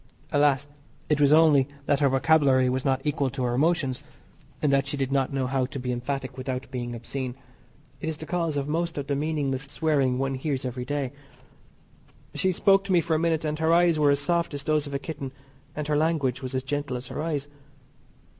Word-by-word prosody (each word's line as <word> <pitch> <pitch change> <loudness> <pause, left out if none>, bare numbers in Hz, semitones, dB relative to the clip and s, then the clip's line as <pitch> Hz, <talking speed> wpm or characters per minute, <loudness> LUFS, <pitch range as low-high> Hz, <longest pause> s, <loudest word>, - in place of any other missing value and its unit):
Alas, 145 -1 +3 0.4
it 150 -1 +2
was 140 0 +5
only 150 -4 +6 0.2
that 145 - +2
her 140 -2 +4
vocabulary 135 -2 +4
was 130 +1 -1
not 135 -1 +1
equal 145 -2 0
to 130 0 -4
her 120 -1 0
emotions, 145 -1 +1 0.6
and 145 -2 +2
she 145 +1 -5
did 135 -1 -1
not 135 -1 +1
know 135 -1 -1
how 130 0 0
to 140 - -7
be 125 0 -3
emphatic 130 +2 -4
without 130 0 -4
being 120 -1 -4
obscene 125 +2 -5 0.6
it 160 - -3
is 155 - -3
the 160 - -7
cause 165 -3 -1
of 140 0 -2
most 165 +2 -1
of 140 - -2
the 140 - -1
meaningless 145 -2 -1
swearing 140 -3 +1
one 135 +1 -1
hears 135 0 -2
every 125 0 -4
day. 140 -2 -2 1.2
She 190 - +1
spoke 195 +2 +4
to 195 - -3
me 180 - +5
for 165 0 -1
a 155 - +2
minute, 165 -1 +1
and 155 0 -2
her 160 0 +2
eyes 170 -2 +4
were 145 -1 +4
as 140 0 +3
soft 170 0 0
as 140 - -5
those 155 0 +1
of 140 - -5
a - - +2
kitten 140 -2 -6 0.4
and 150 -1 -3
her 150 - +1
language 145 -5 +1
was 130 0 -4
as 130 - -1
gentle 145 -1 -2
as 125 - -8
her 135 - -5
eyes. 150 -3 -2
140 Hz, 215 wpm, -26 LUFS, 130-155 Hz, 1.2 s, only